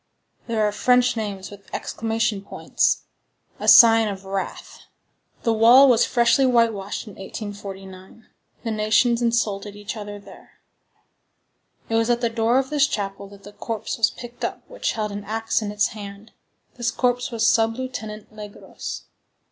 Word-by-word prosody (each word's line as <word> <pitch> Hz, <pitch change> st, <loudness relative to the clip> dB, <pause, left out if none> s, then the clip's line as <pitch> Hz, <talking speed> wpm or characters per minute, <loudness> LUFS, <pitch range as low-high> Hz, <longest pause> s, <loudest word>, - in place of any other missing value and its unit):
There 220 Hz, -2 st, +1 dB
are -, -, -1 dB
French 250 Hz, +3 st, +2 dB
names 200 Hz, -4 st, -5 dB
with 200 Hz, -1 st, -14 dB
exclamation 225 Hz, -2 st, -2 dB
points,—a -, -, -3 dB
sign 225 Hz, -1 st, +8 dB
of 195 Hz, -1 st, -6 dB
wrath. 195 Hz, 0 st, -5 dB, 0.6 s
The 230 Hz, -, +2 dB
wall 240 Hz, +5 st, +7 dB
was 240 Hz, -3 st, +4 dB
freshly 240 Hz, +2 st, +3 dB
whitewashed 230 Hz, -5 st, 0 dB
in 210 Hz, -, -11 dB
1849. 195 Hz, 0 st, -9 dB, 0.4 s
The 230 Hz, -, -2 dB
nations 220 Hz, +3 st, +2 dB
insulted 210 Hz, -4 st, -1 dB
each 205 Hz, +1 st, -6 dB
other 205 Hz, -1 st, -7 dB
there. 200 Hz, -, -16 dB, 1.3 s
It -, -, -5 dB
was 225 Hz, +1 st, +2 dB
at 240 Hz, 0 st, +2 dB
the 235 Hz, -2 st, 0 dB
door 230 Hz, +2 st, +2 dB
of 265 Hz, +1 st, -1 dB
this 295 Hz, -1 st, +3 dB
chapel 200 Hz, -3 st, -4 dB
that 200 Hz, 0 st, -16 dB
the 205 Hz, -, -12 dB
corpse 225 Hz, +1 st, -5 dB
was 220 Hz, -, +4 dB
picked 240 Hz, 0 st, -11 dB
up -, -, -4 dB
which -, -, -3 dB
held 215 Hz, -2 st, -3 dB
an 200 Hz, 0 st, -6 dB
axe 225 Hz, +2 st, -1 dB
in 210 Hz, -1 st, -4 dB
its 210 Hz, 0 st, +1 dB
hand; 205 Hz, 0 st, -10 dB, 0.5 s
this 240 Hz, -1 st, 0 dB
corpse 245 Hz, 0 st, 0 dB
was 230 Hz, -2 st, -1 dB
Sub 225 Hz, 0 st, +3 dB
Lieutenant 220 Hz, -5 st, -7 dB
Legros. 210 Hz, -1 st, -8 dB
220 Hz, 155 wpm, -23 LUFS, 205-235 Hz, 1.3 s, sign